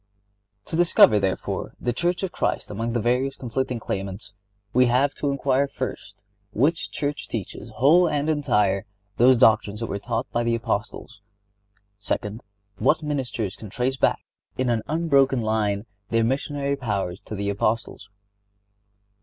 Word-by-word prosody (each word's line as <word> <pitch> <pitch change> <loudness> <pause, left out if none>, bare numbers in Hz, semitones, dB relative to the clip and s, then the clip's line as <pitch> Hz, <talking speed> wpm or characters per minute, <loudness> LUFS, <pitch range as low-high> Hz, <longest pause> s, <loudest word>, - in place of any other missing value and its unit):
To - - -4
discover, 165 -10 +6
therefore, 95 -1 -2
the 120 - -1
Church 175 +8 -1
of 190 - -2
Christ - - -2
among 115 +3 -3
the 120 - +1
various 125 +4 0
conflicting 125 0 -3
claimants 100 -1 -5 0.4
we 125 0 +5
have 130 +4 +2
to 145 - -2
inquire, 140 0 +1
first, 115 -7 -6 0.3
which 165 - +1
church 145 0 -3
teaches - - -6
whole 160 +9 +4
and 145 0 -1
entire 105 -10 +1 0.3
those 125 +1 +6
doctrines 105 -2 +4
that 115 - -2
were 100 -2 -4
taught 115 +2 -2
by 120 - 0
the 115 0 +1
Apostles; 105 -2 -4 0.8
second, 105 +2 -3 0.4
what 155 +1 +2
ministers 130 -9 -2
can 110 - -10
trace 125 +5 -1
back, - - +1 0.3
in 130 -1 +1
an 115 -2 +1
unbroken 140 -6 +2
line, 105 -1 0 0.2
their 115 0 +2
missionary 140 +3 -1
powers 100 -8 -3
to 110 - -6
the 100 0 -2
Apostles. 105 0 -2
120 Hz, 145 wpm, -24 LUFS, 105-140 Hz, 0.8 s, discover